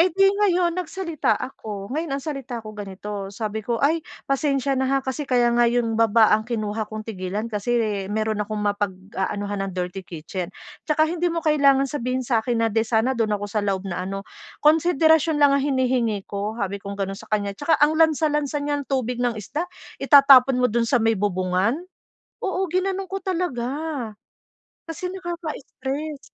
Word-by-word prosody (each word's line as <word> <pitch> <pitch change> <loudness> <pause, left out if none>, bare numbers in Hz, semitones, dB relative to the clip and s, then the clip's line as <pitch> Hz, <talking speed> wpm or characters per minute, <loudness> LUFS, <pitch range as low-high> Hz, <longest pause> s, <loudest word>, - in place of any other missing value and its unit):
Eh 345 - +6
'di 390 +3 +2
ngayon 365 -4 +2
nagsalita 350 -2 -1
ako. 215 -4 -6
Ngayon 310 -2 -2
ang 275 - -7
salita 260 -6 -5
ko 215 - -8
ganito, 200 -1 -6
sabi 215 +1 -4
ko, 230 +2 -2
"Ay, 305 +6 +2 0.2
pasensya 275 0 0
na, 265 -1 0
ha, 275 0 +3
kasi 270 +2 -4
kaya 240 -2 +3
nga 235 0 +4
'yong 235 -1 +1
baba 225 -1 +5
ang 220 +2 +1
kinuha 215 -2 -2
kong 215 0 -6
tigilan 200 0 -4
kasi 215 +4 0 0.3
mayro'n 215 0 -1
akong 215 +1 -3
mapag-aanuhan 205 0 -2
ng - - -7
dirty 180 +1 -3
kitchen. 175 +1 -6 0.4
Saka 310 0 +4
hindi 345 +2 0
mo 335 0 -3
kailangan 280 -3 +4
sabihin 255 -2 -2
sa'kin 230 -1 +1
na 225 - 0
'di 225 - +3
sana 230 +3 +2
do'n 220 -4 0
ako 205 - -5
sa 205 +1 -1
loob 195 -1 -1
na 180 -2 -3
ano, 195 0 -5 0.4
konsiderasyon 320 0 +4
lang 290 -1 +5
ang 280 - +3
hinihingi 255 -7 0
ko." 205 +2 -4
Sabi 200 -2 -3
kong 200 0 -6
ganon 195 -1 -2
sa 220 - -14
kaniya, 205 -2 0
"Tsaka 290 +9 +1
ang 295 +1 +4
lansa-lansa 305 -2 +2
niyang 290 -1 -2
tubig 250 -2 -1
ng 245 -2 0
isda, 295 - -4 0.3
itatapon 275 -2 +7
mo 250 -3 +2
do'n 230 0 +1
sa 255 - +3
may 225 - +4
bubungan." 190 +3 0 0.6
Oo, 380 0 -1
ginano'n 385 +1 0
ko 385 +1 -5
talaga 335 -10 -2 1.2
kasi 330 +2 -5
nakaka-stress. 310 -5 -5
245 Hz, 175 wpm, -23 LUFS, 210-295 Hz, 1.2 s, itatapon